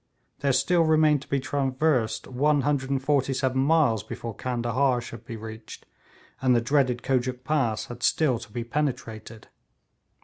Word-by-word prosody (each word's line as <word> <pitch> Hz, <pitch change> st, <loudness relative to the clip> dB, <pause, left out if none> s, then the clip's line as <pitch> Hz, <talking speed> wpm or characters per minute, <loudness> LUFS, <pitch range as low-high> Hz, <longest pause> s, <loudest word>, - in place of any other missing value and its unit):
There 140 Hz, -, +1 dB
still 175 Hz, +6 st, +3 dB
remained 155 Hz, -3 st, +4 dB
to -, -, -13 dB
be 140 Hz, -, 0 dB
traversed 130 Hz, -4 st, 0 dB
147 135 Hz, -1 st, +1 dB
miles 140 Hz, -7 st, +3 dB
before 115 Hz, +1 st, -7 dB
Candahar 125 Hz, +2 st, 0 dB
should 115 Hz, -1 st, -9 dB
be 115 Hz, -, -6 dB
reached, 110 Hz, 0 st, -10 dB, 0.6 s
and 130 Hz, -2 st, +3 dB
the -, -, +4 dB
dreaded 125 Hz, 0 st, +1 dB
Kojuk 130 Hz, -1 st, -1 dB
Pass 130 Hz, -7 st, 0 dB
had 120 Hz, 0 st, -9 dB
still 130 Hz, -3 st, +2 dB
to 110 Hz, -2 st, -12 dB
be 120 Hz, +2 st, -4 dB
penetrated. 115 Hz, -5 st, -4 dB
130 Hz, 135 wpm, -26 LUFS, 120-145 Hz, 0.6 s, remained